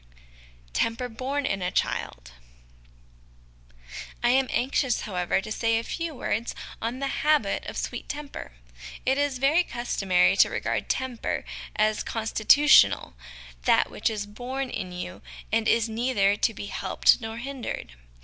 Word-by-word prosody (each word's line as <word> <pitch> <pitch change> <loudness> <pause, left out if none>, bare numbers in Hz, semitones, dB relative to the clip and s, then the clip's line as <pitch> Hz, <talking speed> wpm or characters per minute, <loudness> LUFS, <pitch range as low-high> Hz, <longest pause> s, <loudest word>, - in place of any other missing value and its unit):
Temper 230 - 0
Born 265 +5 -3
in 195 -7 -1
a 180 - 0
Child. - - -2 1.9
I 240 - +4
am 265 +1 +3
anxious, 260 0 +1
how 210 - -6
ever, 180 +1 +1
to 215 - -8
say 225 0 +1
a 225 - -2
few 330 +4 -4
words 230 -1 -2 0.3
on 230 +3 -2
the 275 0 -2
habit 300 -10 +2
of - - -6
sweet - - -4
temper. 290 -1 -6 0.5
It 265 +2 +2
is 285 -2 0
very 290 +7 +3
customary 195 - +1
to - - +6
regard - - -2
temper 260 -3 -2 0.3
as 215 0 +1
constitu 220 +5 +3
tional, 295 - +6 0.5
that - - +4
which - - 0
is 210 -2 -3
born 250 +5 -5
in 185 -3 -4
you 180 0 -7 0.3
and 225 -1 +2
is 230 0 +3
neither 220 -3 +1
to 220 - +1
be 205 - -7
helped 205 +4 +2
nor 225 0 -5
hindered. 260 - -5
230 Hz, 150 wpm, -26 LUFS, 210-265 Hz, 1.9 s, to